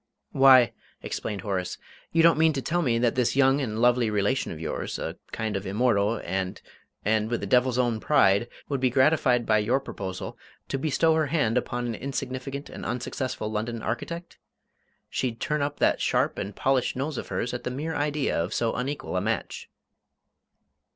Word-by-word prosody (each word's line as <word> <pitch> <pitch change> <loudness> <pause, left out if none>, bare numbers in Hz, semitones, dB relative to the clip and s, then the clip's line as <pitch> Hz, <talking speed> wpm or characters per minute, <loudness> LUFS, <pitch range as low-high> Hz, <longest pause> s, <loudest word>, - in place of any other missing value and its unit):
"Why," 130 -4 +7 0.3
explained 100 -3 -4
Horace, 95 -3 -3 0.3
"you 165 0 +4
don't 165 -1 +5
mean 160 0 +5
to 135 - -2
tell 175 +2 0
me 120 -7 +1
that 120 0 +2
this 125 -1 +1
young 135 +1 +4
and 110 -5 -3
lovely 120 -1 +3
relation 105 +5 0
of 80 - -7
yours, 80 - -4
a - - -4 0.2
kind 110 -2 -3
of 95 0 -3
immortal, 105 0 +2
and 95 -1 -2 0.5
and 110 +1 +1
with 120 - -1
the - - -4
devil's 125 +4 +3
own 120 -3 +1
pride, 105 -5 +3 0.2
would 140 -2 -1
be 130 0 +2
gratified 130 -2 +3
by 110 -1 +3
your 120 +6 +2
proposal 95 -8 -6 0.3
to 135 - -1
bestow 160 +3 +2
her 160 -1 +1
hand 135 -7 +1
upon 120 0 -1
an 120 - -2
insignificant 135 +2 -4
and - - -9
unsuccessful 125 -3 -3
London 110 +1 -3
architect? 170 +9 -5 0.7
She'd 120 -3 -2
turn 150 -3 -1
up 145 +1 -2
that - - +2
sharp - - +1
and 100 +1 -5
polished 135 -2 +1
nose 135 +2 -2
of - - -7
hers 120 - -2
at 125 - -4
the - - -2
mere 150 +6 -3
idea 145 -1 0
of 90 +6 -4
so 115 -1 +1
unequal 130 -3 -3
a - - +1
match!" 110 0 -3
125 Hz, 185 wpm, -26 LUFS, 110-140 Hz, 0.7 s, Why